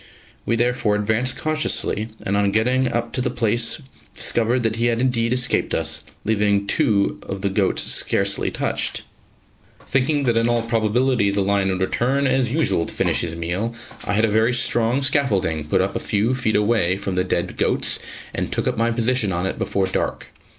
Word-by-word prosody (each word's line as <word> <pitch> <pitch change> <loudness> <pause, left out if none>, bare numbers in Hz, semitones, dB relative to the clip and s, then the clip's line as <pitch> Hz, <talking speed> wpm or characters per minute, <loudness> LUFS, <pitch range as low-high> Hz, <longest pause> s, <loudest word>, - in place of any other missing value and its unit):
We 115 - +2
therefore 120 -2 +1
advanced 110 +5 0
cautiously, 155 -8 -1 0.2
and 100 - 0
on 100 0 +2
getting 125 +4 +1
up 120 0 -2
to 130 - -1
the 125 - 0
place 120 +3 +1 0.3
discovered 120 +2 +1
that 115 0 0
he 120 +1 +1
had 115 -1 0
indeed 120 -2 +1
escaped 125 0 +1
us, - - 0 0.2
leaving 105 -2 +2
two 100 0 +1
off 95 0 -4
the 100 - 0
goats 95 -1 +1
scarcely - - +1
touched. - - -2 0.8
Thinking 140 +3 +1
that 120 -3 +1
in 115 +1 +2
all 120 -1 +1
probability 115 0 +1
the 100 0 0
lion 100 0 +1
would 95 0 -2
return 130 +8 0
as 130 -2 +1
usual 140 - +1
to - - -5
finish - - +1
his 85 -1 -3
meal, 90 +8 -3 0.3
I - - -2
had 110 +2 +3
a - - 0
very 110 +4 +2
strong 120 +2 +1
scaffolding 105 - 0
put 95 +5 +1
up 95 +1 -2
a - - 0
few 110 +4 0
feet 125 -4 0
away 105 -4 +2
from 100 -1 -4
the 90 0 +1
dead 95 - -2
goats, - - 0 0.3
and - - -3
took - - -2
up - - 0
my 115 +1 +2
position 115 -2 +1
on 90 +1 -1
it 95 - -3
before 100 -1 0
dark. 95 - -3
115 Hz, 190 wpm, -21 LUFS, 100-125 Hz, 0.8 s, had